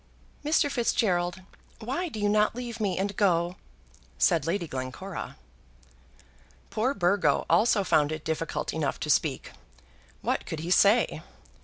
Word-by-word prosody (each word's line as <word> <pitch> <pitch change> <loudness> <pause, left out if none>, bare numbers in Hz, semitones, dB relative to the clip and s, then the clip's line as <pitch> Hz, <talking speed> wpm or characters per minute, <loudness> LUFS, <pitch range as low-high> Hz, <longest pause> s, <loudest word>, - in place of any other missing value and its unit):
"Mr. 300 0 +2
Fitzgerald, 185 -7 0 0.3
why 275 +11 -3
do 225 - -7
you 205 - +1
not 210 +1 +2
leave 240 -1 -6
me 200 -4 -1
and 200 +1 -2
go?" 175 -3 +2 0.6
said 165 -2 +2
Lady 170 0 -1
Glencora. 130 +8 -6 1.3
Poor 255 +6 0
Burgo 175 -5 +2
also 200 +4 +3
found 150 -5 +2
it 155 -1 -5
difficult 160 0 -2
enough - - -2
to - - 0
speak. - - 0 0.7
What - - -1
could 160 - -4
he 170 +2 -4
say? 200 +5 +4
195 Hz, 135 wpm, -27 LUFS, 170-220 Hz, 1.3 s, say